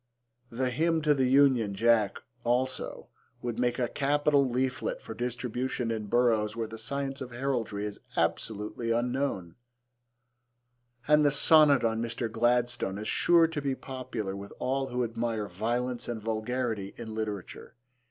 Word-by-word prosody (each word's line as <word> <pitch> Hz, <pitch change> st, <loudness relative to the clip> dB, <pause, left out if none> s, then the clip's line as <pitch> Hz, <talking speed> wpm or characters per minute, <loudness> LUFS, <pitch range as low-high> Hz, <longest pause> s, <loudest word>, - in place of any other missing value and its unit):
The 125 Hz, +2 st, -1 dB
hymn 160 Hz, +4 st, +1 dB
to 150 Hz, -1 st, +5 dB
the 130 Hz, -2 st, +2 dB
Union 130 Hz, -6 st, +4 dB
Jack, 110 Hz, -1 st, +3 dB, 0.3 s
also, 125 Hz, +2 st, -1 dB, 0.3 s
would 120 Hz, -1 st, -3 dB
make 120 Hz, -1 st, +1 dB
a 125 Hz, -, +1 dB
capital 145 Hz, 0 st, +2 dB
leaflet 130 Hz, +1 st, -1 dB
for -, -, -8 dB
distribution 125 Hz, 0 st, -2 dB
in 110 Hz, -2 st, -3 dB
boroughs 110 Hz, -2 st, +2 dB
where 115 Hz, -1 st, -2 dB
the 110 Hz, 0 st, -8 dB
science 135 Hz, +3 st, -3 dB
of 130 Hz, -, -5 dB
heraldry 120 Hz, -5 st, -2 dB
is 105 Hz, -1 st, -5 dB, 0.2 s
absolutely 105 Hz, +7 st, -1 dB
unknown, 120 Hz, -6 st, -1 dB, 1.5 s
and 150 Hz, 0 st, +5 dB
the 145 Hz, -, +5 dB
sonnet 145 Hz, 0 st, +5 dB
on 110 Hz, 0 st, +1 dB
Mr. 115 Hz, 0 st, -3 dB
Gladstone 120 Hz, -3 st, +1 dB
is 105 Hz, -, -5 dB
sure 170 Hz, -1 st, +5 dB
to 160 Hz, -3 st, -3 dB
be 140 Hz, -2 st, -1 dB
popular 125 Hz, -8 st, -5 dB
with 100 Hz, 0 st, -8 dB
all 135 Hz, +1 st, -1 dB
who 125 Hz, 0 st, -1 dB
admire 115 Hz, -2 st, -2 dB
violence 120 Hz, +6 st, -2 dB
and 120 Hz, -2 st, -3 dB
vulgarity 110 Hz, -1 st, -2 dB
in 110 Hz, -2 st, -7 dB
literature. 105 Hz, -3 st, -5 dB
120 Hz, 145 wpm, -29 LUFS, 110-130 Hz, 1.5 s, to